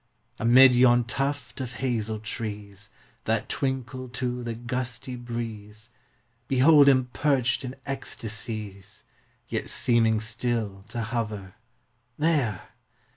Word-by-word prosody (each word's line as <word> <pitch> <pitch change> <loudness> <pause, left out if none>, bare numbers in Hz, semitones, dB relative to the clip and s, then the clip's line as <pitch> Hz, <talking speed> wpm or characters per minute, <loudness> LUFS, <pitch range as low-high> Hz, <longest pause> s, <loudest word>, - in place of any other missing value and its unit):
Upon 115 +1 +3
yon 125 -2 +7
tuft 135 +2 -3
of 125 -1 -5
hazel 115 -5 -2
trees, 105 -2 -6 0.4
That - - 0
twinkle 130 -1 -3
to 125 0 -3
the 115 -1 -4
gusty 125 +1 -4
breeze, 115 -3 -6 0.6
Behold 140 +2 +6
him 130 -2 +3
perched 135 -3 +1
in 130 0 -5
ecstasies, 110 -6 -5 0.4
Yet - - -3
seeming 115 -2 +3
still 110 -3 -2
to 115 +1 -3
hover; 105 -4 -4 0.6
There 145 - 0
120 Hz, 105 wpm, -26 LUFS, 110-130 Hz, 0.6 s, yon